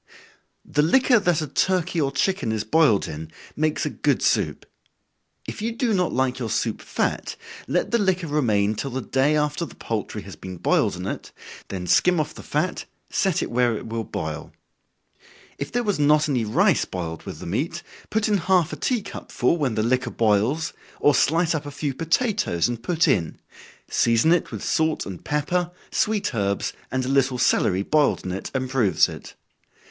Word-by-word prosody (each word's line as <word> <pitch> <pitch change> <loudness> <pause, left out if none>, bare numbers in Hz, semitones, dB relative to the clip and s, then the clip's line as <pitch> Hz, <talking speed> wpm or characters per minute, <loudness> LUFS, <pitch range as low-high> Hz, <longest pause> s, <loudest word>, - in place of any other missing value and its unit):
_ - - -25 0.6
The 150 - +4
liquor 245 - +4
that 175 -5 +1
a - - -4
turkey 180 0 +1
or 135 -1 +1
chicken 140 - 0
is 110 -1 -1
boiled 115 -3 +3
in, 80 +1 -7 0.2
makes 155 0 0
a - - -2
good - - 0
soup. - - +1 0.8
If - - -6
you 230 +2 -1
do 235 -1 0
not 180 -3 +1
like 130 0 0
your 115 -3 -3
soup - - -1
fat, - - -2 0.3
let - - 0
the 235 - +3
liquor 190 -3 +1
remain 110 -9 +1
till 135 +5 -4
the 130 0 -4
day 135 +3 +2
after 150 +2 0
the - - -8
poultry 110 -3 -4
has - - -10
been 95 -1 -8
boiled - - +2
in - - -6
it, - - -5 0.4
then 95 -2 -5
skim 165 - +4
off 150 0 -2
the - - -10
fat, 165 +5 -2 0.3
set 190 -4 +1
it - - -5
where 120 -2 +2
it - - -8
will 115 0 -2
boil. 80 -7 -5 1.1
If 140 - -4
there 245 0 0
was 205 -8 0
not 150 +1 +4
any 125 -6 0
rice 105 - +3
boiled 80 -3 -5
with - - -6
the - - -9
meat, 150 - -2 0.3
put 220 +1 +1
in 210 -1 +3
half 180 -2 +2
a - - -5
tea 245 -5 0
cup 200 - -9
full, 125 +8 +2
when 135 -8 0
the 110 - +1
liquor 125 +2 +1
boils, 115 +8 +1 0.3
or 145 - +4
slice 165 +6 +2
up 150 -2 -3
a - - -4
few 145 0 -3
potatoes 165 - +1
and 120 -1 -4
put 165 +6 +1
in 85 -5 +1 0.5
season 115 +7 +3
it 175 - 0
with - - -6
salt 160 -1 +1
and 95 -3 -8
pepper, 170 +4 0 0.2
sweet 215 -8 0
herbs, 100 -3 -1 0.2
and 130 -1 -1
a - - -3
little 135 -1 +2
celery 95 -5 +2
boiled 150 +4 +2
in 90 - -3
it 95 - -4
improves 130 - +2
it. - - -10
145 Hz, 195 wpm, -24 LUFS, 110-170 Hz, 1.1 s, The